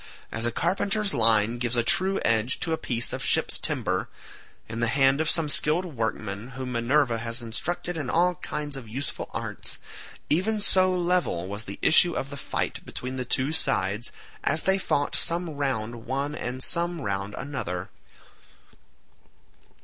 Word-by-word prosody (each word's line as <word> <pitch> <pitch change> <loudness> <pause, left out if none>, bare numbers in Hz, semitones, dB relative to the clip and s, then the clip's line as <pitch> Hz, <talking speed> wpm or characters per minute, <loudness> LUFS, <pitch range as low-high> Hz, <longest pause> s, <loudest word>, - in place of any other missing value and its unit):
As 115 +1 0
a - - 0
carpenter's 195 - 0
line 115 -1 +3
gives 120 0 0
a 120 - +2
true 190 +10 +3
edge 115 +2 +1
to 165 - 0
a - - 0
piece 120 -1 0
of - - -4
ship's - - +3
timber, - - -1 0.6
in 115 +1 -5
the 120 - +2
hand 135 +4 +3
of 160 - +1
some 165 -2 +3
skilled 155 +4 +5
workman 110 - -4
whom 130 -1 -4
Minerva 120 0 +2
has 115 +1 -2
instructed 170 +9 -3
in 145 -5 -3
all 175 +4 +3
kinds 150 -3 -4
of 130 -4 -8
useful 135 +5 -4
arts—even 205 +8 -3
so 185 -2 +4
level 175 - 0
was 100 +3 -6
the 100 - -7
issue 175 +2 +5
of 135 - -3
the - - -5
fight - - -3
between 130 +1 -5
the 125 - -3
two 130 +4 0
sides, 105 -7 +1 0.3
as 155 +2 +1
they 190 0 +2
fought 145 -5 0
some 170 0 0
round 120 -6 -3
one 140 +3 -1
and 130 -2 -3
some 170 -1 +1
round 100 -1 -3
another. 95 -10 -4
135 Hz, 160 wpm, -26 LUFS, 115-165 Hz, 0.6 s, skilled